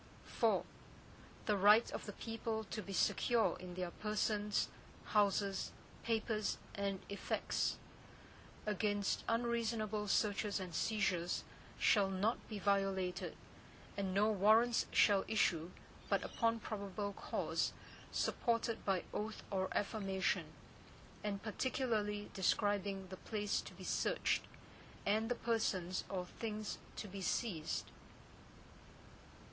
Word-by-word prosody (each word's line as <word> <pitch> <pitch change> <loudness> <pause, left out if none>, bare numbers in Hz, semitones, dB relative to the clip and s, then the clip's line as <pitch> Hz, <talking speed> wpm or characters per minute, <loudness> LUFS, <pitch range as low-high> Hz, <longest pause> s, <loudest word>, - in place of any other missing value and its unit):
IV - - +5 0.8
The 210 - +3
right 210 +4 +6
of - - -5
the 205 - -5
people 225 0 -3
to 215 - -2
be 200 - -8
secure 230 +4 +3
in 180 -1 -7
their 180 -1 -3
persons, 210 0 0 0.4
houses, 200 -2 +2 0.3
papers, 220 -2 0 0.2
and 200 -1 -2
effects, 200 - -1 0.9
against 205 -1 0
unreasonable 230 -3 0
searches 205 0 +1
and 185 -3 -6
seizures, 185 -3 +1 0.3
shall 200 -3 +4
not 195 +5 +1
be 215 - -4
violated, 195 -2 0 0.6
and 195 -2 -1
no 205 +3 +4
Warrants 220 +4 +5
shall 200 -2 +5
issue, 175 -6 +2 0.4
but - - +2
upon 230 -1 +1
probable 200 -2 -3
cause, - - -1 0.4
supported 230 -1 0
by 190 -3 +1
oath 215 +1 -3
or 190 -1 0
affirmation, 195 -2 0 0.8
and 200 -1 -2
particularly 215 -3 -1
describing 195 0 +1
the 185 - -7
place 210 -1 -1
to - - -10
be - - -10
searched, - - +1 0.6
and 220 +3 +2
the 245 - +1
persons 200 -7 0
or 185 -2 -2
things 215 +2 -4 0.2
to 210 - -5
be 195 0 -6
seized. 185 -5 -1
205 Hz, 110 wpm, -38 LUFS, 195-220 Hz, 0.9 s, right